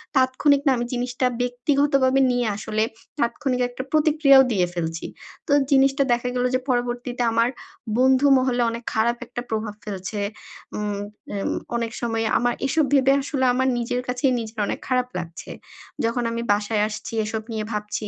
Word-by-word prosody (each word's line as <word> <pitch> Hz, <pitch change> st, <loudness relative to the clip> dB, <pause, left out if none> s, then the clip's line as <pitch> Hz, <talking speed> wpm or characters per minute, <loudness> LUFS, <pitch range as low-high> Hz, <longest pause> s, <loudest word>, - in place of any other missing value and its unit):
তাৎক্ষণিক 265 Hz, +2 st, +3 dB
না -, -, +6 dB
আমি 240 Hz, -, -1 dB
জিনিসটা 245 Hz, +1 st, -1 dB, 0.2 s
ব্যক্তিগতভাবে 270 Hz, +2 st, +2 dB
নিয়ে 245 Hz, -1 st, 0 dB
আসলে 215 Hz, +1 st, -1 dB, 0.4 s
তাৎক্ষণিক 250 Hz, +1 st, 0 dB
একটা 245 Hz, +1 st, -6 dB
প্রতিক্রিয়াও 300 Hz, -3 st, +5 dB
দিয়ে 180 Hz, -4 st, +2 dB
ফেলছি। 165 Hz, -1 st, -3 dB, 0.4 s
তো 290 Hz, -, -2 dB, 0.2 s
জিনিসটা 275 Hz, 0 st, +4 dB
দেখা 240 Hz, +1 st, -1 dB
গেল 250 Hz, 0 st, +1 dB
যে 255 Hz, -, +2 dB
পরবর্তীতে 245 Hz, 0 st, -1 dB
আমার 230 Hz, +1 st, +2 dB, 0.5 s
বন্ধু 260 Hz, +2 st, +4 dB
মহলে 255 Hz, -1 st, +1 dB
অনেক 235 Hz, +1 st, -6 dB
খারাপ 235 Hz, +2 st, +1 dB
একটা 240 Hz, 0 st, -5 dB
প্রভাব 215 Hz, -1 st, -2 dB
ফেলছে। 200 Hz, 0 st, -5 dB, 0.6 s
উম 205 Hz, -1 st, -2 dB, 0.3 s
উম 200 Hz, -1 st, -2 dB, 0.2 s
অনেক 230 Hz, -1 st, -1 dB
সময় 225 Hz, -1 st, -1 dB
আমার 245 Hz, 0 st, +1 dB
এসব 315 Hz, +1 st, +2 dB
ভেবে 270 Hz, -1 st, +5 dB
আসলে 270 Hz, -2 st, -1 dB
আমার 260 Hz, +1 st, +1 dB
নিজের 240 Hz, +1 st, -1 dB
কাছেই 250 Hz, +1 st, +1 dB
নিজের 220 Hz, 0 st, -8 dB
অনেক -, -, -3 dB
খারাপ 250 Hz, -1 st, +1 dB
লাগছে। 165 Hz, -1 st, -8 dB, 0.5 s
যখন 235 Hz, +1 st, 0 dB
আমি 230 Hz, -, -3 dB
বাসায় 210 Hz, +1 st, 0 dB
আসছি 215 Hz, +1 st, -6 dB
এসব 220 Hz, 0 st, -3 dB
নিয়ে 215 Hz, -1 st, -2 dB
ভাবছি 210 Hz, 0 st, -3 dB
245 Hz, 160 wpm, -23 LUFS, 220-260 Hz, 0.6 s, না